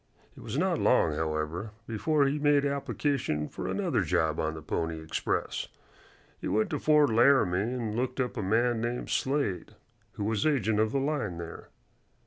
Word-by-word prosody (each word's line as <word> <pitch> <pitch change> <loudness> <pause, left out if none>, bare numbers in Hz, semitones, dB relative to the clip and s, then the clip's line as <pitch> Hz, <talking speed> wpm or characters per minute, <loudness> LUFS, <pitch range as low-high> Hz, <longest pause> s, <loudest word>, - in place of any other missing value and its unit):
It - - -13
was - - -4
not - - +1
long, 80 - +3
however, 80 +6 -3
before 140 +7 +1
he 140 +2 0
made 145 -1 +3
application 140 - -1
for - - -6
another - - 0
job 80 -1 +1
on 80 0 -1
the 80 - -7
Pony 80 +1 -2
Express. 80 0 -2 0.7
He - - -4
went 110 +1 +1
to - - -1
Fort 150 -4 +4
Laramie 115 -4 +4
and 110 -4 -3
looked 130 +2 -2
up 125 -1 -1
a 110 - -2
man 115 +4 +1
named 120 +1 -3
Slade, 135 -9 -1 0.4
who - - -4
was 105 0 0
agent 110 -8 +2
of 110 0 +2
the 140 - 0
line 135 - -2
there. 85 -1 -8
110 Hz, 170 wpm, -29 LUFS, 90-140 Hz, 0.7 s, Fort